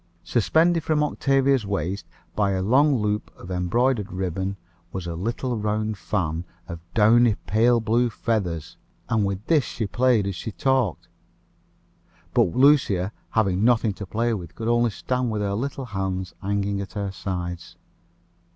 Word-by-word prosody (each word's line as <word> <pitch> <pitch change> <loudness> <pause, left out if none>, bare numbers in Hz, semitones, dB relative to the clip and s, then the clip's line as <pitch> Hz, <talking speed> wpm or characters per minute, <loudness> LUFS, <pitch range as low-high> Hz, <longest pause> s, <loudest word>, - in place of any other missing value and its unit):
Suspended 160 - +2
from 155 -2 +1
Octavia's 135 -3 +2
waist 100 -1 -3 0.3
by 100 -2 +2
a 95 0 -1
long 135 +7 +4
loop 105 -2 -1
of 90 - -11
the - - -3
embroidered 105 +5 +1
ribbon, 95 +1 -3 0.3
was 95 -2 -5
a 85 - -4
little 115 +8 -2
round 105 +1 -1
fan, 85 -5 -2 0.2
of 85 -2 -6 0.2
downy 115 +1 +5
pale 115 +3 +3
blue 115 +2 +2
feathers, 100 - -2 0.3
and 110 -3 +2
with 100 +2 -4
this 155 -4 +3
she 115 - -4
played 120 0 +2
as 100 - -2
she 110 - -5
talked; 130 -4 0 1.3
but 85 - +2
Lucia, 125 -9 +4 0.2
having 100 -3 +1
nothing 115 -3 +3
to 100 0 -8
play 115 +5 0
with, 90 -7 -6
could 115 - -4
only 120 0 +3
stand 125 +3 -2
with 105 -2 -1
her 100 -1 -1
little 135 +4 -3
hands 95 -4 -3
hanging 100 0 -1
at 95 - -8
her 100 -2 -3
sides. 90 -2 -5
105 Hz, 155 wpm, -24 LUFS, 95-120 Hz, 1.3 s, downy